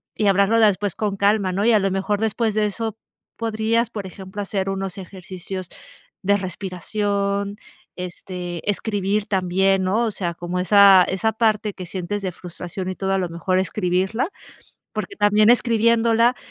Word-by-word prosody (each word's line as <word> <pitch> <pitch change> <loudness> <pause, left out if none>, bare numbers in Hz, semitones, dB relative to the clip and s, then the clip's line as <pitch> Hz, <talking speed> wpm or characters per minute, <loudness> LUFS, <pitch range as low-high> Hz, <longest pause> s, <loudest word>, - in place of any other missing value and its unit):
y 210 - +1
hablarlo 200 +3 +4
después 205 -3 +3
con 205 -2 -2
calma", 200 -1 +2
¿no? 195 +3 0
Y 235 - +5
a 215 - +5
lo 195 - +1
mejor 195 +2 -1
después 220 0 0
de 210 -1 +2
eso 220 +1 -4 0.4
podrías, 225 +1 0
por 205 -4 -6
ejemplo, 190 +1 -9
hacer 195 -1 -2
unos 195 0 -4
ejercicios 185 0 -7 0.6
de 200 +1 +3
respiración, 200 +2 -2 0.4
este, 180 0 -6
escribir 205 0 -1
también, 190 0 +1
¿no? 215 +6 +1
O 220 - -1
sea, 175 -4 -3
como 175 +1 -4
esa 195 0 +7
esa 220 +4 0
parte 215 -2 +1
que 185 - -8
sientes 190 +3 -4
de 185 -2 -2
frustración 180 +2 -7
y 185 - -4
todo, 195 0 -1
a 195 - +2
lo 185 - -1
mejor 180 +2 0
escribirla, 190 - 0 0.7
porque 400 - -4
también 210 - +4
escribiéndola, 230 0 +3
200 Hz, 160 wpm, -22 LUFS, 185-215 Hz, 0.7 s, esa